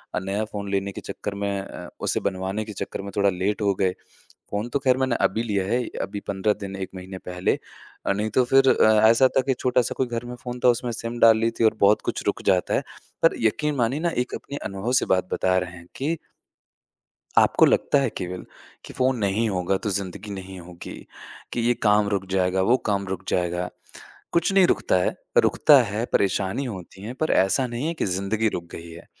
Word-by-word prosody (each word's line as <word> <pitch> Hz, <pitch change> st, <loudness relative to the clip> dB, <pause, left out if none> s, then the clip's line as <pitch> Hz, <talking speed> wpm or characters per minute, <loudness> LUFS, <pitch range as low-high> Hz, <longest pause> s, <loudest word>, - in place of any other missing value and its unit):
अ, -, -, +1 dB
नया 100 Hz, +3 st, -2 dB
फ़ोन 100 Hz, -1 st, -6 dB
लेने 100 Hz, 0 st, -1 dB
के -, -, -8 dB
चक्कर 105 Hz, -, -5 dB
में 100 Hz, 0 st, -2 dB
अ, 95 Hz, -, -9 dB
उसे -, -, 0 dB
बनवाने 95 Hz, +3 st, -2 dB
के 105 Hz, -, -7 dB
चक्कर 100 Hz, -, -5 dB
में 100 Hz, 0 st, -7 dB
थोड़ा 100 Hz, -1 st, +3 dB
लेट 95 Hz, +3 st, -1 dB
हो 100 Hz, -1 st, +2 dB
गए। 95 Hz, 0 st, +1 dB, 0.6 s
फ़ोन 105 Hz, +3 st, -2 dB
तो 130 Hz, -, 0 dB
ख़ैर 130 Hz, -2 st, +2 dB
मैंने 130 Hz, -1 st, +1 dB
अभी 110 Hz, +4 st, +1 dB
लिया 100 Hz, -4 st, -1 dB
है 120 Hz, +4 st, 0 dB, 0.2 s
अभी 100 Hz, +1 st, -4 dB
15 100 Hz, +1 st, +1 dB
दिन 100 Hz, -1 st, -5 dB
1 95 Hz, -1 st, -5 dB
महीने 95 Hz, 0 st, -8 dB
पहले 90 Hz, 0 st, 0 dB, 0.5 s
अ, -, -, +3 dB
नहीं 105 Hz, +2 st, -2 dB
तो 125 Hz, +4 st, +3 dB
फिर 135 Hz, +2 st, +4 dB
अ, 110 Hz, -3 st, +5 dB
ऐसा 130 Hz, +3 st, +5 dB
था -, -, +6 dB
कि 135 Hz, -, +2 dB
छोटा-सा 125 Hz, -1 st, +1 dB
कोई 130 Hz, -, +1 dB
घर 120 Hz, -1 st, -4 dB
में 120 Hz, 0 st, -6 dB
फ़ोन 125 Hz, 0 st, -7 dB
था -, -, +7 dB
उसमें 120 Hz, 0 st, +1 dB
सिम 115 Hz, +1 st, -5 dB
डाल 115 Hz, -1 st, +7 dB
ली 115 Hz, +1 st, +1 dB
थी -, -, +4 dB
और 110 Hz, -, +4 dB
बहुत 100 Hz, +1 st, +5 dB
कुछ -, -, -5 dB
रुक -, -, -1 dB
जाता 90 Hz, -1 st, 0 dB
है -, -, +1 dB, 0.4 s
पर -, -, +5 dB
यकीन 150 Hz, +7 st, +1 dB
मानिए 125 Hz, +4 st, 0 dB
ना 170 Hz, +1 st, +1 dB
एक -, -, -10 dB
अपने 140 Hz, -, -6 dB
अनुभव 100 Hz, +5 st, -3 dB
से -, -, -1 dB
बात 90 Hz, 0 st, -1 dB
बता 95 Hz, 0 st, +2 dB
रहे 90 Hz, -1 st, -3 dB
हैं 85 Hz, 0 st, -13 dB
कि 155 Hz, +5 st, -1 dB, 1.2 s
आपको -, -, +5 dB
लगता 145 Hz, -, +3 dB
है 135 Hz, -, +1 dB
केवल 90 Hz, 0 st, -5 dB, 0.4 s
कि -, -, -10 dB
फ़ोन 130 Hz, 0 st, +1 dB
नहीं 105 Hz, +2 st, +1 dB
होगा 90 Hz, 0 st, 0 dB
तो 105 Hz, -, 0 dB
ज़िंदगी 100 Hz, +1 st, -4 dB
नहीं 95 Hz, -1 st, -7 dB
होगी 85 Hz, 0 st, -10 dB, 0.6 s
कि -, -, -1 dB
ये 120 Hz, +1 st, +2 dB
काम 105 Hz, -1 st, +4 dB
रुक 100 Hz, -2 st, -1 dB
जाएगा 95 Hz, 0 st, +1 dB
वो 125 Hz, -, +6 dB
काम 100 Hz, -1 st, 0 dB
रुक 95 Hz, 0 st, -4 dB
जाएगा 90 Hz, 0 st, 0 dB, 0.6 s
कुछ 170 Hz, +3 st, +2 dB
नहीं 195 Hz, -2 st, +6 dB
रुकता -, -, +1 dB
है -, -, -1 dB, 0.3 s
रुकता 145 Hz, -3 st, +6 dB
है 110 Hz, 0 st, -2 dB
परेशानी 100 Hz, +6 st, +1 dB
होती 95 Hz, -5 st, -8 dB
है, 110 Hz, +4 st, -5 dB
पर 155 Hz, +5 st, -2 dB
ऐसा 95 Hz, +8 st, +3 dB
नहीं 120 Hz, +4 st, -4 dB
है 165 Hz, -, -1 dB
कि -, -, -2 dB
ज़िंदगी 100 Hz, +4 st, 0 dB
रुक 90 Hz, -4 st, -4 dB
गई 85 Hz, 0 st, -8 dB
है 85 Hz, -, -12 dB
105 Hz, 220 wpm, -24 LUFS, 95-120 Hz, 1.2 s, था